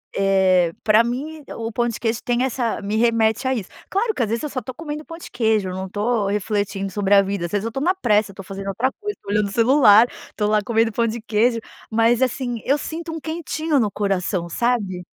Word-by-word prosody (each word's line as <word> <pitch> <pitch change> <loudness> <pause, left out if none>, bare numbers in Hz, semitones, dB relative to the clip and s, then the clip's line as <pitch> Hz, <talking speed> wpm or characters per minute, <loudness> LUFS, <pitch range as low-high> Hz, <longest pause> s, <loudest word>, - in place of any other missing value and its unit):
eh, 190 -3 +3
pra 215 +1 +5
mim 290 +6 -4
o 225 0 -4
pão 240 +2 0
de 230 - -4
queijo 225 0 -1
tem 245 0 +1
essa 250 -3 -1
me 205 +2 -2
remete 230 +1 +2
a 260 - +2
isso. 215 -7 -4 0.2
Claro 435 +3 0
que - - -3
às 220 - -2
vezes 230 +4 -2
eu 300 - -2
só 265 - -3
estou 255 +1 -8
comendo 300 -1 -6
pão 330 - -9
de 340 - -10
queijo. 220 -5 +1
Eu 185 - -5
não 190 0 -4
estou 210 +2 0
refletindo 200 -1 -2
sobre 200 +1 +1
a 200 - +7
vida. 195 -2 -2
Às - - -14
vezes, 205 -1 -1
eu - - -1
estou 270 +5 -4
na 365 +4 +2
pressa. 215 - +2
Eu - - -16
estou 195 0 -10
fazendo 195 0 -7
outra 230 +7 0
coisa. 415 0 -3
Estou 200 - -8
olhando 210 0 +2
o - - -7
celular. 230 -1 +6 0.2
Estou 210 - -2
lá 210 0 +2
comendo 225 +1 +1
pão 230 +2 +1
de 230 +1 -3
queijo, 230 +2 +1 0.3
mas 230 +2 +3
assim, 250 -2 -1
eu 280 +3 +2
sinto 325 +2 -6
um 325 - -5
quentinho 315 -1 -1
no 215 -4 +1
coração, 190 -3 -1
sabe? 205 -4 -1
225 Hz, 240 wpm, -21 LUFS, 200-255 Hz, 0.3 s, a